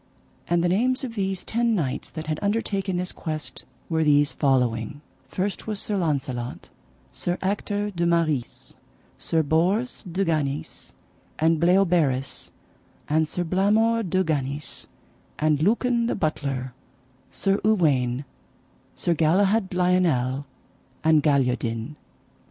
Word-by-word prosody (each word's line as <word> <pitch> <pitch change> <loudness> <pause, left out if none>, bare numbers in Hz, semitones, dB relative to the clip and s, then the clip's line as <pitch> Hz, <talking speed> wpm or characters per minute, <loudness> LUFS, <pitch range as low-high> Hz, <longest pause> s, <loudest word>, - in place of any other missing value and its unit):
And 170 0 +2
the - - +3
names 250 +9 +1
of 245 -3 -4
these 195 -3 -2
ten 235 0 +1
knights 140 -9 -2
that 160 -1 -7
had 155 0 -2
undertaken 200 -3 -1
this 180 0 -2
quest 155 -1 -5 0.2
were 160 -1 +1
these 145 -1 +4
following: 130 -1 0 0.3
First 190 +10 -3
was 210 -2 -2
Sir 210 - -2
Launcelot, 135 -8 -2 0.4
Sir 175 +1 -2
Ector 205 +1 -1
de 170 -2 0
Maris, 160 -7 -1 0.5
Sir 160 -1 +1
Bors 180 - +1
de 195 +3 0
Ganis, 150 -4 -2 0.4
and 160 0 +3
Bleoberis, 170 -7 +2 0.6
and 155 +1 +2
Sir 180 - -1
Blamore 210 +6 +2
de 185 -2 +1
Ganis, 145 -3 -3 0.5
and 150 -1 +2
Lucan 235 +5 +2
the - - 0
Butler, 135 -6 -2 0.6
Sir 195 0 0
Uwaine, 145 - +2 0.7
Sir 170 - +1
Galihud 190 +6 +2
Lionel, 165 -8 +1 0.6
and 155 -1 +5
Galiodin. 125 -3 0
165 Hz, 120 wpm, -25 LUFS, 145-195 Hz, 0.7 s, and